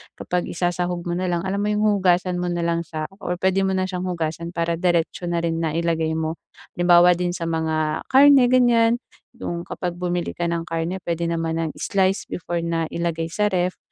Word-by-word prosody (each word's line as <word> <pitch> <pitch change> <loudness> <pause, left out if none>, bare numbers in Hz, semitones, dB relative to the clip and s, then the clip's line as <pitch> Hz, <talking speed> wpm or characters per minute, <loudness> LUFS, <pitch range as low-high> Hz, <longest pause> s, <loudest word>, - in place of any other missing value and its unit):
kapag 180 0 -2
isasahog 175 0 -2
mo 175 - -4
na 185 0 -1
lang, 175 -1 -1
alam 190 +1 -2
mo 205 - 0
'yong 210 0 +1 0.2
hugasan 180 -1 +2
mo 180 - -1
na 175 -1 -1
lang 170 0 -1
siya 155 -1 -4 0.2
or 180 - -2
puwede 190 +2 +1
mo 190 - 0
na 185 - +1
siyang 185 -1 -3
hugasan 170 0 -3
para 170 -1 -1
diretso 175 0 0
na 170 -1 -1
rin 165 -1 -1
na 160 -2 -1
ilagay 165 -1 0
mo. 160 +1 -3 0.4
Halimbawa 175 0 +6
din 175 0 -1
sa 170 - -5
mga 160 -1 -1
karne, 275 0 +7
ganiyan, 240 -2 +4 0.4
'yong 170 -7 -4
kapag 180 -2 -3
bumili 175 0 -2
ka 175 0 -2
ng 170 0 -2
karne, 165 +2 -2
puwede 170 0 -1
naman 165 -1 -1
nang 160 -2 -2
i-slice 195 0 0
before 175 0 -4
na 165 -1 -1
ilagay 165 -1 -2
sa 210 +5 0
ref, 180 0 0
175 Hz, 205 wpm, -22 LUFS, 165-185 Hz, 0.4 s, karne